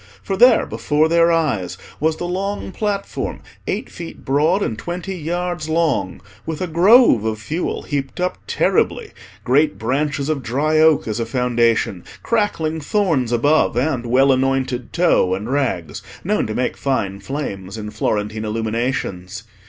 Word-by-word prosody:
For 195 - -2
there, 240 +3 +6
before 150 +2 +1
their 170 +1 +4
eyes, 110 - 0 0.2
was 160 +1 +1
the 175 - -4
long 195 +2 -3
platform, 205 -1 -3 0.3
eight - - -2
feet 170 -1 -10
broad, 155 +9 +2
and 110 - -2
twenty 175 - -5
yards 175 0 -3
long, 155 - 0 0.2
with 160 -2 -4
a 185 - -1
grove 180 - +5
of 110 -1 -1
fuel 155 +11 -3
heaped 140 -1 -4
up 180 0 -1
terribly, - - +1 0.3
great 145 +5 +2
branches 140 +4 -1
of 155 -3 -1
dry 145 +6 +1
oak 155 -5 +4
as 110 +1 -2
a 115 - -1
foundation, 115 -6 +1 0.2
crackling 160 -8 0
thorns 150 - +1
above, 145 +1 +2
and 125 -2 0
well 135 +3 +4
anointed 130 -1 0
tow 130 - +3
and 105 +6 -5
rags, 95 - -1 0.2
known 210 - 0
to 110 - -4
make 125 - -1
fine 105 -8 -1
flames 100 -5 -5
in 105 -1 -6
Florentine 105 +1 -2
illuminations. 110 -4 -3
140 Hz, 150 wpm, -20 LUFS, 115-170 Hz, 0.3 s, there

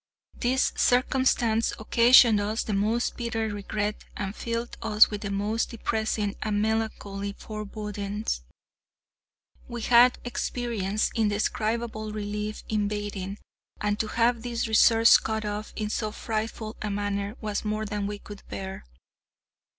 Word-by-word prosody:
This 255 +1 +2
circumstance 245 -3 +2
occasioned 235 0 +6
us 215 +2 -1
the 215 - -3
most 215 +4 0
bitter 225 -2 -2
regret 210 +1 -3
and 195 0 -4
filled 235 0 -3
us 215 0 +5
with 210 -1 -4
the 205 - -3
most 205 +3 -1
depressing 220 -3 -1
and 210 -1 0
melancholy 205 -2 -2
forebodings. 210 - -4 1.3
We 240 -1 -6
had 245 +2 +6
experienced 230 -4 -1
indescribable 215 0 -1
relief 210 0 -4
in 210 -2 0
bathing, 205 -1 -4 0.4
and 210 0 -1
to 220 - 0
have 235 +1 +2
this 235 -1 -2
resource 225 +1 +6
cut 220 -1 -3
off 210 +1 -4
in 215 -1 -3
so 215 -1 -2
frightful 220 0 -4
a 210 - -2
manner 205 +1 -2
was 210 -2 -3
more 215 0 -2
than 205 -1 -2
we 205 0 -4
could 205 0 -11
bear. 190 0 -6
215 Hz, 130 wpm, -27 LUFS, 205-230 Hz, 1.3 s, occasioned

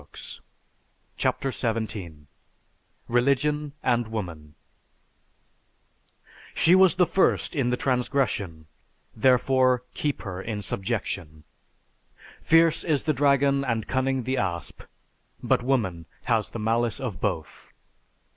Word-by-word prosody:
"_) - - -8 0.8
CHAPTER 135 - -1
XVII 110 - -4 0.8
RELIGION 140 +4 +1
AND 120 -2 +1
WOMAN 85 -9 -6 2.0
She 170 - +4
was 190 -2 +6
the 180 - +4
first 190 -1 +1
in 135 -4 +1
the 125 - 0
transgression 125 - -1 0.5
therefore 130 +1 +3
keep 145 -2 -2
her 95 -3 -5
in 105 -1 -4
subjection. 95 -7 -3 1.0
_Fierce 165 0 +4
is 150 -4 0
the 155 - +1
dragon 140 0 +3
and 115 -4 -2
cunning 130 0 0
the 130 +3 -1
asp; 85 - -3 0.6
but - - +2
woman 100 -11 -1 0.2
has 115 -4 +1
the - - -7
malice 115 0 0
of 120 -8 -5
both. 80 -2 -4
120 Hz, 110 wpm, -25 LUFS, 105-135 Hz, 2.0 s, was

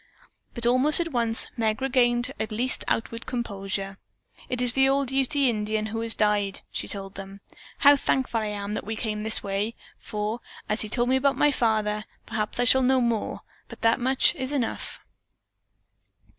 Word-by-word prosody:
But 235 -1 -1
almost 255 +6 +4
at 335 -1 -2
once 230 -3 +2
Meg 220 -1 0
regained 245 -2 +1
at 220 - -3
least 245 +4 -1
outward 230 +1 -2
composure. 195 -4 -4 0.5
"It 250 - -2
is 245 -1 +5
the 270 0 +4
old 275 -1 +1
Ute 270 +1 +1
Indian 215 -6 +1
who 220 +1 -4
has 230 0 +2
died," 205 -2 +1
she - - -4
told 195 -1 -5
them. 195 0 -10 0.4
"How 285 0 +7
thankful 260 -4 0
I 215 - -2
am 205 0 -4
that - - -3
we 220 +2 -4
came 215 -1 -3
this 220 0 +3
way, 200 +3 -2 0.2
for 210 +1 -4 0.3
he - - -4
has - - 0
told 240 +2 0
me 260 - +3
about 275 +1 +1
my 295 - +4
father. 215 -4 0 0.2
Perhaps 220 0 -3
I - - +3
shall 265 +2 +5
know 260 +1 +3
more, 235 -3 -1 0.3
but - - -12
that 230 +2 +3
much 260 +2 +3
is 260 0 -5
enough." 260 -6 -3
230 Hz, 180 wpm, -25 LUFS, 210-260 Hz, 0.5 s, How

